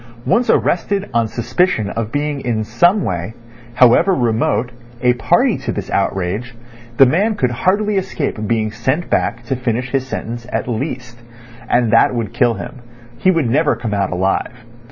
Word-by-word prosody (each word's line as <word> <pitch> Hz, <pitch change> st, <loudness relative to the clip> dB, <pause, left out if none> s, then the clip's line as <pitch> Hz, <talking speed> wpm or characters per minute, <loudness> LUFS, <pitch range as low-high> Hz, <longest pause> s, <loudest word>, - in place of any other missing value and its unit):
Once 240 Hz, +1 st, +2 dB
arrested 195 Hz, +3 st, +1 dB
on 115 Hz, -1 st, +2 dB
suspicion 120 Hz, -, 0 dB
of 115 Hz, -1 st, -4 dB
being 145 Hz, 0 st, -2 dB
in 115 Hz, -4 st, -1 dB
some 175 Hz, -, +2 dB
way, 90 Hz, +5 st, -3 dB, 0.4 s
however 130 Hz, +10 st, +5 dB
remote, 120 Hz, 0 st, 0 dB, 0.3 s
a 125 Hz, 0 st, +4 dB
party 120 Hz, -, +2 dB
to -, -, -3 dB
this -, -, -5 dB
outrage, 100 Hz, +5 st, -2 dB, 0.4 s
the 135 Hz, -, +8 dB
man 200 Hz, -, +1 dB
could 125 Hz, -9 st, 0 dB
hardly 200 Hz, -, +1 dB
escape 185 Hz, -, -3 dB
being 110 Hz, -1 st, 0 dB
sent 130 Hz, +9 st, -2 dB
back -, -, 0 dB
to 135 Hz, -, -2 dB
finish 125 Hz, 0 st, -2 dB
his 135 Hz, -1 st, -1 dB
sentence 120 Hz, -1 st, -5 dB
at -, -, -2 dB
least. 125 Hz, 0 st, -4 dB, 0.5 s
And 120 Hz, -2 st, +2 dB
that 115 Hz, +2 st, +4 dB
would 115 Hz, -4 st, -3 dB
kill 120 Hz, -1 st, +2 dB
him; 105 Hz, -, -8 dB, 0.4 s
he 185 Hz, -, +3 dB
would 165 Hz, -8 st, +2 dB
never 145 Hz, +6 st, +2 dB
come 110 Hz, -3 st, -4 dB
out 100 Hz, -2 st, 0 dB
alive. 95 Hz, +6 st, -2 dB
120 Hz, 165 wpm, -17 LUFS, 110-150 Hz, 0.5 s, the